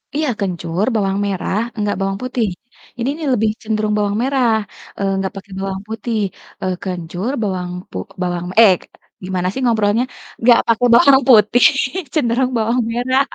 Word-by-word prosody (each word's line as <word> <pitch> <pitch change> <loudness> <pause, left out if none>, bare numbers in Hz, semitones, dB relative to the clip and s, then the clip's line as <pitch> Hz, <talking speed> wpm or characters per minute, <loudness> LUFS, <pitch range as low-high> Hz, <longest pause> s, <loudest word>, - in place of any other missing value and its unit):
iya 305 -1 0
kencur, 180 -1 -2
bawang 195 -2 0
merah, 195 0 -2 0.2
enggak 205 -1 0
bawang 195 0 -1
putih, 250 -3 -1 0.5
ini 235 +3 0
nih 315 -2 -4
lebih 220 -2 +2
cenderung 215 -1 -1
bawang 205 0 0
merah, 265 -2 +1 0.5
eee, 195 -1 0
enggak 190 0 -2
pake 195 +1 -10
bawang 195 0 -3
putih, 225 +1 -3 0.4
eee, 185 -1 -1
kencur, 180 +4 -4
bawang 185 -3 -2 0.2
pu - - -6 0.2
bawang, 175 -1 -2
eee, 215 -4 +8 0.5
gimana 185 -1 -1
sih 265 - -4
ngobrolnya, 225 -1 +2 0.4
enggak 235 0 +6
pake 230 +1 +2
bawang 270 +2 +7
putih 230 +1 +6 0.5
cenderung 255 -3 +1
bawang 230 +3 +1
merah. 255 +3 +1
215 Hz, 155 wpm, -18 LUFS, 195-240 Hz, 0.5 s, eee